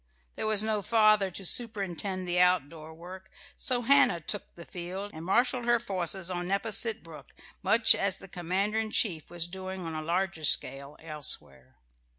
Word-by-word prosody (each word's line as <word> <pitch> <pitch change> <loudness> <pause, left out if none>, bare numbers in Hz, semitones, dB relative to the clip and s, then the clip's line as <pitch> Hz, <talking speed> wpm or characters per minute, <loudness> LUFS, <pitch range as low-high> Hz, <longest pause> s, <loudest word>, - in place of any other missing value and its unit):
There - - -3
was 215 -1 +2
no 215 -1 0
father 215 -2 +3
to 185 +2 -7
superintend 195 -4 0
the 175 0 0
outdoor 165 -3 +1
work; 180 +4 -11 0.3
so 250 -4 -2
Hannah 275 -8 +4
took 200 +6 -4
the 170 - -11
field, 185 +3 -6
and 160 - -8
marshalled 240 +6 +1
her 240 0 +3
forces 185 -3 -2
on 175 0 -3
Nepasset 210 +3 +2
Brook 165 -2 -13 0.3
much 225 0 +5
as 195 -1 -1
the 195 - -13
commander 190 +5 -2
in 220 -1 -2
chief 175 -8 -1
was 175 -1 -3
doing 190 0 -7
on 165 - -5
a 155 - -4
larger 175 +1 -2
scale 140 0 +1
elsewhere. 145 - -4
185 Hz, 165 wpm, -29 LUFS, 170-215 Hz, 0.3 s, much